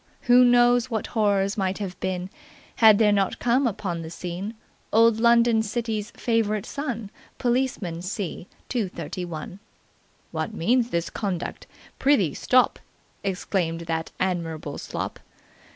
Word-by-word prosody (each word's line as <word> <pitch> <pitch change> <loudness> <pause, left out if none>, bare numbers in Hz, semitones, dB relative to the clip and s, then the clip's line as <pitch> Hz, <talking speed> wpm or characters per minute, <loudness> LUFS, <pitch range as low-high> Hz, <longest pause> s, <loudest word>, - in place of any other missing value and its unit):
Who 245 +1 +6
knows 245 0 +4
what 220 -4 -2
horrors 205 -2 +1
might 190 0 0
have 195 -3 -5
been, 185 0 -3 0.5
had 220 -2 +7
there 210 -1 +4
not 195 -2 +1
come 245 +2 +2
upon 190 -6 -3
the 160 - -7
scene 180 +6 -5 0.4
old 225 0 +5
London 235 -1 +5
city's 220 -1 -3
favourite 215 -3 0
son, 240 -8 -4 0.3
Policeman 240 -9 -1
C. 185 -1 -4 0.2
231. 180 - -4 0.7
'What 220 - -3
means 240 +6 +2
this 170 -5 -2
conduct? 190 -5 -4 0.3
Prithee 265 - +3
stop!' 255 0 +3 0.4
exclaimed 180 -3 -1
that 165 -1 -3
admirable 165 -5 -2
slop. - - -5
205 Hz, 120 wpm, -25 LUFS, 180-235 Hz, 0.7 s, had